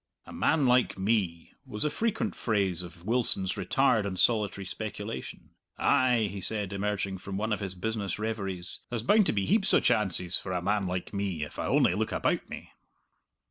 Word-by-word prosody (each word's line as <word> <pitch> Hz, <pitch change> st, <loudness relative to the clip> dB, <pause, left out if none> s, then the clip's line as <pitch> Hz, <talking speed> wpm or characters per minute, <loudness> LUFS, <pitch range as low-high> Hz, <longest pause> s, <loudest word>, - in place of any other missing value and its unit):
"A -, -, -11 dB
man 155 Hz, -3 st, +2 dB
like 125 Hz, -3 st, +3 dB
me," 95 Hz, -5 st, -1 dB
was 105 Hz, +5 st, -3 dB
a 150 Hz, -, +1 dB
frequent 225 Hz, -1 st, -1 dB
phrase 100 Hz, -6 st, 0 dB
of 85 Hz, 0 st, -11 dB
Wilson's 110 Hz, -5 st, +1 dB
retired 130 Hz, -5 st, +2 dB
and 95 Hz, -2 st, -4 dB
solitary 105 Hz, -4 st, +2 dB
speculation. 65 Hz, -6 st, -6 dB, 0.3 s
"Ay," 125 Hz, -3 st, +3 dB
he 100 Hz, -1 st, -6 dB
said, 105 Hz, -2 st, -2 dB
emerging 100 Hz, -1 st, -2 dB
from 95 Hz, +1 st, -5 dB
one 110 Hz, +2 st, 0 dB
of -, -, -2 dB
his 95 Hz, -2 st, -4 dB
business 100 Hz, 0 st, -2 dB
reveries, 100 Hz, -5 st, -4 dB
"there's 120 Hz, -2 st, -3 dB
bound 210 Hz, -, +4 dB
to -, -, +3 dB
be 100 Hz, -2 st, 0 dB
heaps 210 Hz, -1 st, +3 dB
o' -, -, +6 dB
chances 90 Hz, -4 st, +1 dB
for 95 Hz, -, -5 dB
a 90 Hz, -, 0 dB
man 100 Hz, 0 st, +1 dB
like 90 Hz, +2 st, -4 dB
me, 100 Hz, -6 st, -2 dB
if 75 Hz, -, -8 dB
I -, -, -1 dB
only -, -, +4 dB
look -, -, -1 dB
about -, -, 0 dB
me." -, -, -8 dB
100 Hz, 185 wpm, -29 LUFS, 95-115 Hz, 0.3 s, o